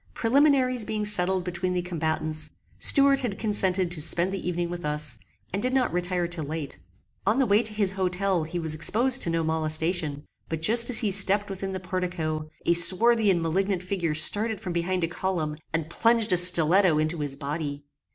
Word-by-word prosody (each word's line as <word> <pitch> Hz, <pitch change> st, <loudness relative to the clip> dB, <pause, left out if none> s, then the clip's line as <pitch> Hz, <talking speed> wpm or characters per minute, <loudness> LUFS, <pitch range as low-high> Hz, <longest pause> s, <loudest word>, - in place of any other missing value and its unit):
Preliminaries 255 Hz, -1 st, +2 dB
being 215 Hz, 0 st, -4 dB
settled 190 Hz, -2 st, +2 dB
between 180 Hz, +1 st, -4 dB
the 180 Hz, -1 st, -2 dB
combatants, 155 Hz, -2 st, -2 dB, 0.3 s
Stuart 275 Hz, -1 st, +5 dB
had 235 Hz, -7 st, -4 dB
consented 190 Hz, -4 st, 0 dB
to 170 Hz, -4 st, -2 dB
spend 170 Hz, +4 st, +3 dB
the 195 Hz, -, -6 dB
evening 175 Hz, 0 st, -3 dB
with 175 Hz, 0 st, -7 dB
us, 150 Hz, -2 st, -2 dB, 0.3 s
and 200 Hz, -, -2 dB
did 255 Hz, +3 st, -1 dB
not 255 Hz, -7 st, 0 dB
retire 180 Hz, 0 st, -2 dB
till 170 Hz, -2 st, -4 dB
late. 150 Hz, -1 st, -7 dB, 0.5 s
On 215 Hz, +4 st, +2 dB
the 270 Hz, -, +2 dB
way 210 Hz, 0 st, +2 dB
to 220 Hz, -2 st, +1 dB
his 210 Hz, -3 st, -1 dB
hotel 185 Hz, -1 st, -2 dB
he 160 Hz, +3 st, -6 dB
was 160 Hz, -2 st, -1 dB
exposed 240 Hz, -, +2 dB
to -, -, 0 dB
no 165 Hz, 0 st, -1 dB
molestation, 160 Hz, -1 st, -1 dB, 0.2 s
but 160 Hz, -1 st, -5 dB
just 230 Hz, +6 st, +4 dB
as 245 Hz, -, +4 dB
he 215 Hz, -4 st, +2 dB
stepped 200 Hz, +1 st, +2 dB
within 195 Hz, 0 st, -6 dB
the 190 Hz, -, -5 dB
portico, 175 Hz, -4 st, -5 dB, 0.2 s
a 170 Hz, -, +3 dB
swarthy 210 Hz, +6 st, +3 dB
and 175 Hz, -3 st, 0 dB
malignant 185 Hz, +3 st, -2 dB
figure 180 Hz, -4 st, -3 dB
started 210 Hz, +7 st, +5 dB
from 185 Hz, -4 st, -6 dB
behind 175 Hz, +1 st, -2 dB
a -, -, +1 dB
column. 170 Hz, -3 st, -4 dB, 0.2 s
and 160 Hz, -1 st, -3 dB
plunged 230 Hz, 0 st, +1 dB
a -, -, +2 dB
stiletto 175 Hz, 0 st, +4 dB
into 155 Hz, +2 st, -2 dB
his 145 Hz, -2 st, -4 dB
body. 145 Hz, 0 st, -6 dB
180 Hz, 190 wpm, -25 LUFS, 160-205 Hz, 0.5 s, Stuart